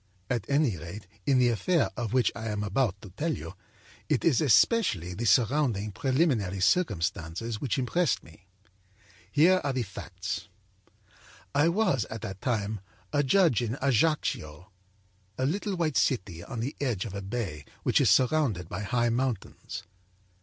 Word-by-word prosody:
At 120 +1 -2
any 140 - +2
rate, 85 +7 -8 0.2
in 135 - +4
the 125 -1 +4
affair 140 - +1
of 120 -4 -3
which 125 -1 +3
I 115 -1 -5
am 105 -1 -2
about 105 -1 0
to 100 - -10
tell 155 - -1
you, 80 - -8 0.6
it - - +1
is 160 -6 +4
especially 115 - +3
the 115 +6 -4
surrounding, 115 -1 +2
preliminary 130 - +1
circumstances 100 - 0
which 135 - -1
impressed 140 +4 +1
me. 85 +3 -18 0.8
Here 180 - +5
are 140 -1 0
the 130 -2 0
facts: 100 -2 -6 1.1
âI 145 +4 +4
was, 180 - +1
at 110 -1 -7
that 95 -3 -6
time, 110 -3 -1 0.3
a 145 - +3
judge 155 - +3
at 120 +2 -2
Ajaccio, 115 - 0 0.7
a 130 - 0
little 195 +6 -1
white 160 -5 0
city 95 -9 0
on 115 - -5
the 130 +5 -3
edge 120 -8 -1
of 105 - -6
a 100 - -4
bay 95 -7 -4 0.2
which - - +3
is - - +4
surrounded 130 - +2
by 90 - -4
high 120 +3 +1
mountains. 120 -3 -3
120 Hz, 155 wpm, -28 LUFS, 100-140 Hz, 1.1 s, Here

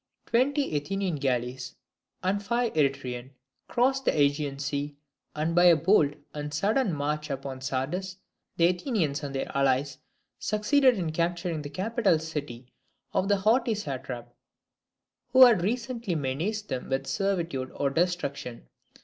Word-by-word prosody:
Twenty 275 - +1
Athenian 185 +3 -1
galleys, 130 -1 -2 0.5
and 195 +2 +1
five 235 +3 0
Eretrian, 130 -4 -1 0.4
crossed 265 +2 +1
the - - +3
AEgean 145 -1 +1
Sea; 145 +1 -3 0.4
and 155 +2 -1
by 175 +1 +5
a 175 -1 +8
bold 155 -3 +3 0.2
and 150 0 -5
sudden 205 - +1
march 150 0 -2
upon 135 -1 -5
Sardis 165 +9 -3 0.4
the 170 - +5
Athenians 175 - 0
and 140 -2 -5
their 135 - -3
allies 135 0 +1 0.4
succeeded 245 +4 +3
in 170 -4 -2
capturing 170 0 -1
the 145 - -6
capital 195 - +1
city 145 -6 -6 0.5
of 190 - +1
the 205 0 +3
haughty 225 +4 +2
satrap, 130 - -6 1.0
who 260 0 +10
had 230 -7 +5
recently 235 -1 -2
menaced 165 +10 -2
them 130 - -4
with 135 0 -1
servitude 170 -10 -1
or 140 -1 0
destruction. 140 -7 -2
160 Hz, 135 wpm, -27 LUFS, 140-200 Hz, 1.0 s, who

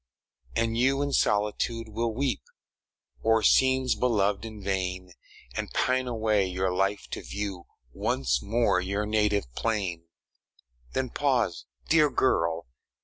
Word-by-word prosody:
And 115 0 0
you 135 +3 +3
in 140 -1 -2
solitude 105 +2 +1
will 115 +2 -1
weep 130 +3 -1 0.8
O'er 115 -1 +3
scenes 130 0 +4
beloved 105 -3 +1
in 110 -3 -8
vain, 90 -2 -2 0.4
And - - -3
pine 130 0 +1
away 110 -4 +1
your 95 0 -1
life 100 +2 0
to - - -4
view 100 -4 -5 0.3
Once - - 0
more 115 - +2
your 100 +3 -2
native 105 - +1
plain. 95 - -2 0.9
Then 130 -2 -1
pause, 125 -11 0 0.2
dear 155 -2 +5
girl! 85 -11 +1
105 Hz, 125 wpm, -27 LUFS, 95-120 Hz, 0.9 s, dear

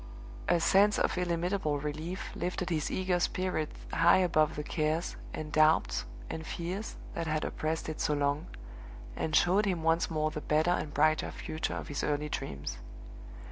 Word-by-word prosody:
A 170 - +4
sense 200 +5 +4
of - - +1
illimitable 175 -3 0
relief 155 +5 -4
lifted 180 0 -2
his 155 -2 0
eager 185 -1 0
spirit 180 -4 0 0.2
high 170 +1 +6
above 155 -5 +3
the 150 - -3
cares, 155 +2 -1 0.2
and 155 -1 -5
doubts, 155 +1 +3 0.2
and 160 - -5
fears 180 +6 -4 0.2
that 165 -1 -3
had 155 0 0
oppressed 160 +1 -2
it 155 - -4
so 150 - +2
long, 145 +1 0 0.7
and 155 - -1
showed 195 +6 +4
him 175 -4 -1
once 165 +1 +2
more 155 -1 0
the 155 -1 -5
better 155 +4 +2
and 155 -4 -1
brighter 155 +2 +2
future 155 +1 -4
of - - -5
his 145 - -3
early 150 0 0
dreams. 70 - -4
160 Hz, 165 wpm, -31 LUFS, 150-175 Hz, 0.7 s, high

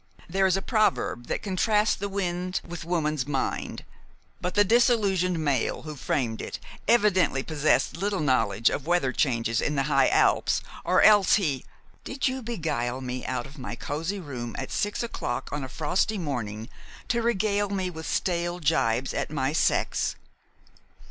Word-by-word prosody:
There 190 +2 +2
is 190 0 +2
a 195 - -4
proverb 215 - +1
that - - -2
contrasts 210 +2 +2
the 200 +1 -4
wind 180 -2 -2
with 170 0 -6
woman's 155 -5 -1
mind; 135 -2 -2 0.6
but 180 - -3
the 205 - +6
disillusioned 200 -5 +3
male 145 -6 0
who 155 -1 -7
framed 120 -5 -1
it - - -5 0.3
evidently 200 - +3
possessed 155 0 +1
little 195 +3 -1
knowledge 115 -7 +2
of 150 - -4
weather 175 -7 +2
changes 115 -4 +1
in 150 - -1
the 135 - +1
high 135 -2 +3
Alps, - - +3 0.2
or - - +3
else 205 -3 +7
he 150 - -1 0.2
" - - -32
"Did 270 +2 -2
you 260 0 -2
beguile 155 - -2
me 125 -1 -4
out 130 0 -2
of 140 +2 -13
my 125 -2 -5
cozy 165 +10 -3
room 125 -8 -6
at - - -5
six 205 +3 -1
o'clock 130 - -4
on 145 0 -3
a 130 - -5
frosty 180 +10 0
morning 115 - -4 0.4
to 235 -1 +1
regale 205 -3 +1
me 190 -2 -2
with 160 -2 -7
stale 175 -1 -1
jibes 130 -6 +1
at - - -2
my 140 -1 -1
sex?" - - +1
165 Hz, 165 wpm, -26 LUFS, 135-195 Hz, 0.6 s, else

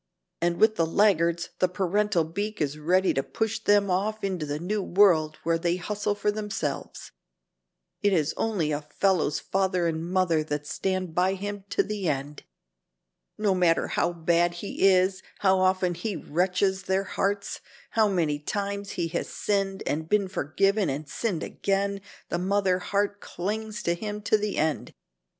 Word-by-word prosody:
And 170 0 +1
with 220 0 +4
the 165 - +3
laggards, 170 -2 +2
the 185 - +4
parental 195 0 +1
beak 205 +7 -4
is 150 0 -1
ready 185 +5 +2
to 135 - +1
push 220 +8 -2
them 205 -3 +3
off 215 +4 -1
into 185 -6 -2
the 145 +1 -2
new 200 +6 -2
world 175 -6 +3
where 165 0 +1
they 170 +1 +1
hustle 205 +2 -2
for 210 0 0
themselves. 210 0 -4 0.9
It 205 - +3
is 160 -5 +1
only 190 -9 0
a 145 0 -1
fellow's 155 +1 +1
father 190 -2 0
and 160 -1 -1
mother 175 -3 +1
that 150 -1 -3
stand 185 +1 -2
by 185 +3 +2
him 200 0 -5
to - - +2
the 205 -5 -2
end. 145 +1 -3 1.0
No 210 -2 +2
matter 175 -3 +2
how 170 - +1
bad 170 +1 +1
he 195 +1 +1
is, 185 0 +3 0.2
how 190 -1 +4
often 185 -1 +2
he 185 +4 -4
wrenches 185 +4 0
their 190 +1 +1
hearts, 200 +1 -2 0.3
how 220 -1 +3
many 165 -7 0
times 200 +5 -3
he 170 - -1
has 170 - -3
sinned 195 -2 -1
and 160 +2 -2
been 205 -2 +2
forgiven 195 +3 +1
and 145 +2 -4
sinned 185 +3 -2
again, 200 0 -1 0.3
the 170 - -1
mother 190 0 +1
heart 205 +2 -1
clings 215 +5 -4
to 170 - +2
him 210 +3 -5
to 215 - +3
the 210 -1 -1
end. 155 0 -1
185 Hz, 165 wpm, -26 LUFS, 170-205 Hz, 1.0 s, with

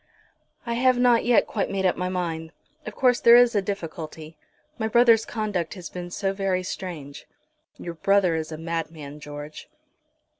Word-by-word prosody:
"I 235 - -2
have 255 +1 +3
not 245 -2 +3
yet 240 -1 +4
quite 205 - -2
made 195 -1 -1
up 185 - +3
my 180 +1 -2
mind. 165 -3 -4 0.3
Of - - -6
course 250 -2 +3
there 235 0 +7
is 245 -1 +6
a 205 - +2
difficulty. 165 -4 -6 0.4
My 220 - 0
brother's 230 -1 +4
conduct 210 -7 -3
has 180 -3 -9
been 175 -1 -6
so 195 +2 -2
very 195 -2 -1
strange." 160 -7 -7 0.5
"Your 170 - -6
brother 190 +1 +2
is 160 0 -3
a 155 - -5
madman, 160 -3 -5
George." 145 +1 -9
185 Hz, 165 wpm, -24 LUFS, 160-220 Hz, 0.5 s, there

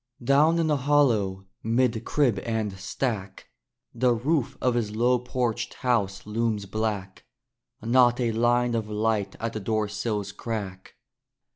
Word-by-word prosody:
Down 145 +6 +4
in 165 - +2
the 150 -2 +2
hollow, 120 -9 +2 0.2
'mid 115 0 +1
crib 125 -9 +2
and 110 -1 -2
stack, 100 -2 -4 0.4
The 120 0 +2
roof 135 +2 0
of 125 - +1
his 110 -3 -2
low 125 +2 +3
porched 125 -2 -2
house 105 -7 0
looms 110 -1 -1
black; 100 -2 -3 0.6
Not 120 +1 +4
a 120 -2 +1
line 120 +2 +2
of 110 -2 -2
light 105 -2 -1
at 115 0 -3
the 110 - -3
door 110 +1 -1
sill's 105 -1 -3
crack. 100 -3 -6
115 Hz, 140 wpm, -26 LUFS, 105-125 Hz, 0.6 s, Down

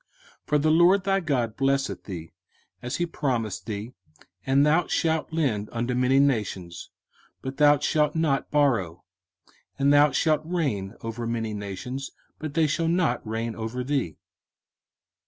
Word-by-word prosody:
05:015:006 - - -46
For 150 - +3
the 155 +2 +2
LORD 175 +4 +5
thy 195 0 +2
God 130 - -1
blesseth 135 0 0
thee, 85 -5 -7 0.5
as 125 +2 -4
he 175 - 0
promised 125 - -2
thee: 110 +3 -5 0.5
and 135 +2 +4
thou 160 +3 +3
shalt 160 -1 0
lend 130 -11 -1
unto 120 +1 -2
many 125 +2 +2
nations, 100 -10 -1 0.5
but 130 +1 -5
thou 145 0 +6
shalt 150 +1 +1
not 155 -4 0
borrow; 110 - +1 0.7
and 140 +1 +3
thou 145 +1 +6
shalt 155 +1 +2
reign 140 - -2
over 115 +1 -4
many 115 -2 -2
nations, 105 +7 -5 0.3
but 155 -2 -6
they 160 - +4
shall 165 +2 0
not 165 -8 +1
reign 115 +1 -3
over 115 +3 -4
thee. 130 - -2
135 Hz, 150 wpm, -25 LUFS, 115-150 Hz, 0.7 s, thou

